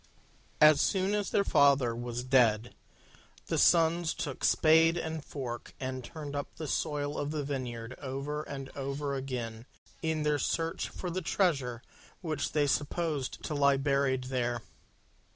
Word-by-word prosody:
As 150 -1 +7
soon 190 +1 +1
as 205 -1 0
their 200 - +2
father 140 -8 +4
was 120 0 -4
dead, 120 -3 +3 0.7
the - - -1
Sons 165 0 +4
took 140 -3 -5
spade 165 +1 +5
and 160 -2 -4
fork 125 -6 -6
and 130 -1 -4
turned 145 +1 -7
up 145 - -5
the 160 - -6
soil 145 +1 -1
of 145 - -2
the 150 -1 -2
vineyard 125 -4 -4
over 140 +2 -4
and 135 -3 -7
over 140 +1 -3
again, 125 -4 -4 0.3
in 160 -2 -1
their 150 -1 +1
search 165 +4 -1
for 180 - -5
the 185 +2 -2
treasure 140 - 0 0.4
which 155 -5 -2
they 150 -1 +3
supposed 145 0 -1
to - - -3
lie 140 -1 +4
buried 135 -2 +1
there. 120 -2 -2
140 Hz, 150 wpm, -30 LUFS, 130-155 Hz, 0.7 s, As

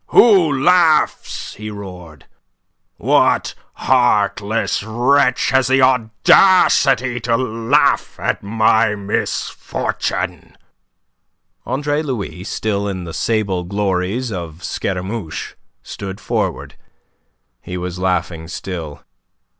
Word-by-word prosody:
"Who 180 - +5
laughs?" 170 -3 +2
he 105 0 -8
roared. 90 -7 -10 0.7
"What - - +2 0.2
heartless 110 -4 +1
wretch 125 +5 +2
has 130 -1 +3
the 130 0 +3
audacity 130 - +4
to 115 0 0
laugh 130 +4 +1
at - - -1
my 110 +1 +2
misfortune?" 100 0 -3 1.1
Andre 145 +2 -1
Louis, 100 - -5
still 100 -1 -2
in 95 -2 -4
the 85 -2 -8
sable 100 -5 -1
glories 100 +5 -2
of 85 -3 -7
Scaramouche, 95 -1 -4 0.3
stood 95 0 -7
forward. - - -3 0.9
He 90 - -6
was 90 0 -5
laughing 90 -3 -2
still. 85 -4 -7
110 Hz, 90 wpm, -18 LUFS, 95-130 Hz, 1.1 s, Who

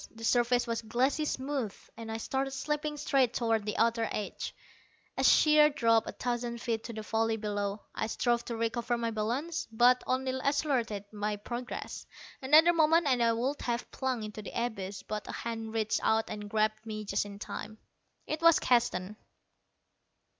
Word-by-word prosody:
The 225 - -10
surface 245 +1 +3
was 230 -1 -2
glassy 255 +7 0
smooth, 265 -6 -2 0.2
and 225 -1 -7
I 225 - -2
started 265 +4 -2
slipping 300 +2 -2
straight 270 -4 +2
toward 225 -3 0
the 210 - -2
outer 230 0 +2
edge, 210 - -4 0.6
a - - -1
sheer 300 -1 +6
drop 230 -6 +2
of - - -6
a - - -36
thousand 240 -1 -2
feet 230 -2 -2
to 235 - -6
the 215 -1 -6
valley 225 +1 0
below. 205 -1 -3
I - - -2
strove 240 +1 0
to 235 - -4
recover 235 +1 -1
my 230 -1 -1
balance, 250 +10 -2
but 245 +2 +4
only 260 0 0
accelerated 255 -8 0
my 210 0 -2
progress. 240 +4 -6 0.3
Another 310 +6 +6
moment 325 0 +4
and 255 -4 +2
I 230 -1 +4
would 255 +5 -1
have 235 0 -3
plunged 255 -4 -2
into 215 0 -7
the 210 - -5
abyss, 200 -4 -6
but 210 -1 -5
a - - -4
hand 225 -1 -4
reached 220 -1 0
out 220 0 +1
and 210 -1 -6
grabbed 215 0 0
me 215 -1 -5
just 200 0 0
in 200 -1 -9
time. 215 +1 -7 0.5
It 310 +1 -3
was 335 -1 +7
Keston. 215 -5 +1
235 Hz, 175 wpm, -30 LUFS, 220-260 Hz, 0.6 s, was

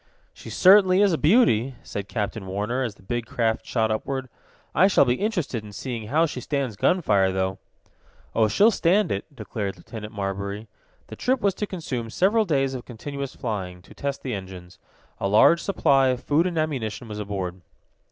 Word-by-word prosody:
"She - - -11
certainly 190 0 +6
is 200 -3 +3
a - - +1
beauty," 140 - +3
said 100 -1 -6
Captain 105 -2 -3
Warner, 105 +7 -2
as 115 -5 -3
the 95 - -21
big 120 +3 -3
craft 110 -1 -1
shot 110 -2 +1
upward. 130 +4 -3 0.4
"I 190 - +5
shall 195 - +4
be 120 - +2
interested 165 - -2
in 105 -1 -11
seeing 115 -2 -5
how 155 +7 +3
she 130 -5 -5
stands 135 -4 -2
gun 180 - +2
fire, 95 -6 +3
though." 95 0 -2 0.7
"Oh, 110 -1 +3
she'll 205 - +4
stand 190 0 +2
it," 100 - -2
declared 105 -4 -5
Lieutenant 110 -2 -9
Marbury. 100 +1 -4 0.4
The - - -10
trip 260 +1 0
was 200 -1 +2
to 210 +2 -4
consume 130 -12 -4
several 210 - +2
days 135 -6 +1
of 125 -2 -5
continuous 140 +3 -6
flying, 95 -6 -5
to - - -15
test 140 -1 -4
the 130 - -3
engines. 95 -2 -8 0.4
A - - 0
large 110 +12 +5
supply 135 -8 +3
of 125 0 -1
food 160 +5 +2
and 175 -2 -3
ammunition 130 -7 -2
was 105 -1 -6
aboard. 95 -3 -4
120 Hz, 185 wpm, -24 LUFS, 105-155 Hz, 0.7 s, certainly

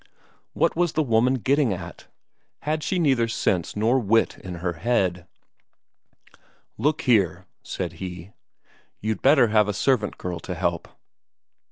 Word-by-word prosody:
What - - +1
was 175 -1 +1
the 155 - +1
woman 120 +1 +2
getting 135 0 +1
at? 90 - -9 0.6
had 155 +1 -1
she 185 +5 -1
neither 135 -9 +2
sense 90 -6 -1
nor 115 +5 +2
wit 115 0 +2
in 90 -2 -7
her 90 +1 -3
head? 90 -4 -1 1.5
"Look 150 +7 0
here," 105 - +2 0.2
said - - -5
he, 90 0 -7 0.7
"you'd 110 -1 -3
better 135 -4 +5
have 105 -1 +3
a 105 - -1
servant 110 -1 0
girl 90 -2 -5
to 90 - -6
help." 85 -1 -2
110 Hz, 140 wpm, -24 LUFS, 90-130 Hz, 1.5 s, better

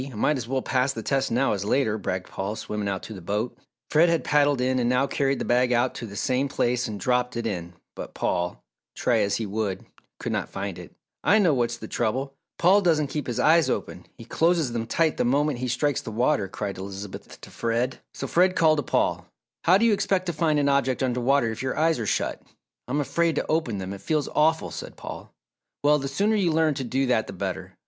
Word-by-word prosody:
I 130 -2 -7
might 145 +7 +1
as 120 -3 -5
well 130 +1 -1
pass 130 +1 +1
the 115 - -6
test 135 +2 0
now 125 +2 +2
as 100 -1 -2
later," 110 +1 +1
bragged 95 -1 -3
Paul, 100 +3 -4
swimming 105 -2 -3
out 95 -1 -3
to 110 - -7
the 95 - -9
boat. 105 +7 -2 0.4
Fred 165 +3 +5
had 165 -1 +1
paddled 145 -2 +3
in 130 0 +1
and 120 -1 +1
now 125 +2 +3
carried 140 -1 0
the - - -3
bag 125 +1 +2
out 120 +1 +2
to 115 - -6
the 100 - -10
same 130 +6 0
place 125 -2 0
and 105 -2 -5
dropped 125 +2 0
it 120 - -3
in 90 -5 -4 0.2
but - - -8
Paul, 90 0 -2 0.3
try - - +2
as 100 0 +1
he 110 - -2
would, 100 -2 -3 0.3
could - - -3
not - - -2
find 95 -2 -5
it. 90 - -11 0.3
"I 205 - +5
know 180 -8 +4
what's 120 -2 0
the 110 - -8
trouble 130 +6 -1 0.2
Paul 190 +4 +5
doesn't 155 -6 +2
keep 150 - -3
his 120 - -2
eyes 165 +1 +4
open. - - -4
He - - -11
closes 165 -5 +1
them 115 -1 -2
tight 160 +5 +1
the - - +2
moment 140 +2 +1
he 130 - -2
strikes 125 +3 0
the - - -7
water," 110 -3 +1
cried 100 0 -5
Elizabeth 95 +1 -8
to - - -12
Fred. 120 +3 -1 0.2
So - - -4
Fred 180 +6 +3
called 155 -1 +4
to - - -1
Paul, - - 0 0.4
"How 180 +3 +6
do 230 - +2
you 225 - +5
expect 195 -2 0
to 175 - -2
find 155 -1 +1
an 145 -1 +2
object 140 -2 +1
under 125 -1 0
water 130 -2 +2
if 110 - -6
your 130 0 -2
eyes 160 -2 +2
are 110 - -3
shut?" - - -1 0.5
"I'm 145 +4 0
afraid 160 +4 +1
to - - -1
open 155 -9 0
them, 95 0 -5
it 100 - -9
feels 155 -3 0
awful," 160 +1 +2
said - - -8
Paul. - - -8 0.5
"Well, 150 +1 +4
the 135 - -3
sooner 205 +11 +1
you 185 -5 +2
learn 160 -1 +2
to 135 -1 -4
do 130 +2 0
that 120 -4 +1
the - - -7
better. - - -5
130 Hz, 235 wpm, -25 LUFS, 110-150 Hz, 0.5 s, How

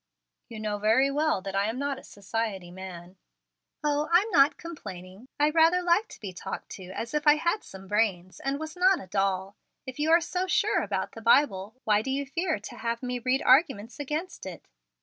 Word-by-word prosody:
"You 225 -2 -8
know 210 -1 -2
very 225 +6 +3
well 300 -7 +1
that 195 0 -5
I 200 +1 +2
am 230 - -4
not 280 0 -2
a - - -15
society 200 -3 -4
man." 180 0 -9 0.7
"O, 295 +1 0
I'm 390 +6 +4
not 280 -4 +5
complaining. 195 - -9
I 295 +1 +4
rather 330 +3 +4
like 355 +5 +3
to - - -13
be 195 -4 -7
talked 190 +2 -6
to 190 - -9
as 195 +7 -6
if 300 0 -1
I 295 - +8
had 340 +7 0
some 190 0 -12
brains, 190 -3 0
and 275 +1 -2
was 315 +1 -6
not 370 +1 +4
a - - -9
doll. 195 0 -1 0.3
If 260 +1 -8
you 305 +2 +1
are 335 +1 +7
so 365 +2 -2
sure 410 +3 +2
about - - -2
the 225 - -10
Bible, 225 -4 +3
why 210 -1 +3
do 265 - -5
you 275 +1 -1
fear 330 - -1
to 210 - -10
have 235 +1 -3
me 250 0 -2
read 255 +3 0
arguments 260 - +3
against 300 +5 -4
it?" - - -9
255 Hz, 210 wpm, -27 LUFS, 200-305 Hz, 0.7 s, I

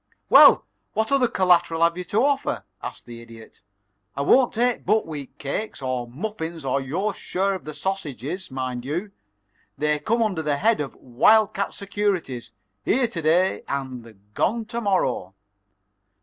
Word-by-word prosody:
"Well, - - +8 0.3
what 220 +2 -1
other 270 -3 +4
collateral 175 -5 +2
have 170 0 +3
you 180 - -4
to 215 +8 +2
offer?" 280 -1 0 0.2
asked - - -7
the 120 -1 -10
Idiot. 115 -1 -14 0.6
"I 140 - 0
won't 250 - +4
take 245 +1 0
buckwheat 155 -10 -1
cakes, 150 +10 -4
or 130 -2 -3
muffins, 160 - -5
or 135 +1 0
your 180 +11 -2
share 195 +1 -1
of 185 - -6
the 155 -1 -7
sausages, 180 -2 -4
mind 130 -2 -4
you. 170 +10 -3 0.7
They 150 0 +1
come 230 +9 +1
under 190 -7 -1
the 150 -2 0
head 220 +2 +2
of 140 - -5
wild 200 - +3
cat 200 - -3
securities 195 - -2 0.3
here 250 - +2
to 205 -8 -4
day 170 +4 +2
and 125 -6 -5
gone 225 - 0
to 235 -1 -3
morrow." 130 - 0
170 Hz, 155 wpm, -24 LUFS, 135-210 Hz, 0.7 s, Well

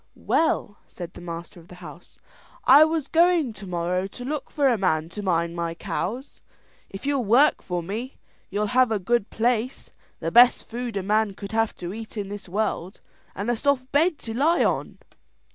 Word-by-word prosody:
"Well," 210 -9 0
said 175 -1 -9
the - - -11
master 170 0 -8
of 165 - -17
the 180 - -13
house, 175 -1 -13 0.5
"I 285 +4 +8
was 315 -2 0
going 335 -6 +3
tomorrow 180 -1 -2
to 245 +5 -9
look 300 +2 -4
for 285 -3 +1
a 250 - +4
man 165 -6 0
to 205 +4 -6
mind 170 -3 0
my 170 -1 -3
cows. 245 +10 -5 0.5
If 195 +5 -9
you'll 280 -3 +1
work 245 +8 +4
for 175 -2 -3
me, 225 +9 -5 0.3
you'll 205 +2 -1
have 255 -2 +4
a 220 - +2
good 215 +2 0
place, 240 +2 -1 0.3
the - - -3
best 240 +1 +6
food 235 -2 -4
a 195 - -2
man 210 0 +1
could 200 0 -8
have 225 0 0
to 175 +1 -6
eat 225 +1 -8
in 200 -1 -4
this 205 -2 -8
world, 195 -2 -2 0.4
and 205 +5 -1
a - - +1
soft 260 +1 0
bed 315 +3 +3
to 225 - -4
lie 310 +8 +3
on." - - -1
215 Hz, 190 wpm, -24 LUFS, 180-255 Hz, 0.5 s, I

